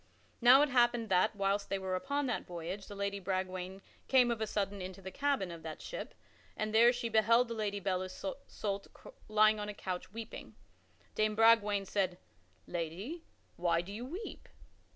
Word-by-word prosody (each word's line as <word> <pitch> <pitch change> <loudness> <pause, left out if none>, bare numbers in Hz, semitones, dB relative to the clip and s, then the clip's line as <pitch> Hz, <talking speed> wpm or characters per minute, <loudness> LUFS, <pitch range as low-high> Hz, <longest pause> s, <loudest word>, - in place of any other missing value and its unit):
Now 255 +4 +8
it 295 - +1
happened 240 -2 +3
that, 190 +4 +3
whilst 200 0 0
they 195 - 0
were 190 -1 -3
upon 280 +9 -1
that 245 -3 -2
voyage, 180 +3 -6
the 205 - -8
Lady 200 0 -2
Bragwaine 185 0 -3 0.2
came 250 -2 +5
of 230 -2 -2
a 220 - 0
sudden 200 -1 -2
into 185 +1 -7
the 190 0 -8
cabin 280 -10 0
of 165 -1 -8
that 160 -1 -7
ship - - -7 0.4
and 215 0 -2
there 235 +2 +7
she 245 -1 -3
beheld 230 +2 +4
the - - -2
Lady 210 -2 -2
Belle 185 -2 0
Isoult 200 -1 -5 0.4
lying 215 0 +4
upon 210 0 -4
a 210 - -6
couch 185 -2 -5
weeping. 225 +1 -8 0.6
Dame 215 0 +1
Bragwaine 210 -3 +5
said, 185 -2 0 0.5
"Lady, 185 - -5 0.3
why 170 -1 +2
do 190 +3 -9
you 225 +4 -5
weep?" 345 - -7
205 Hz, 175 wpm, -33 LUFS, 190-230 Hz, 0.6 s, Now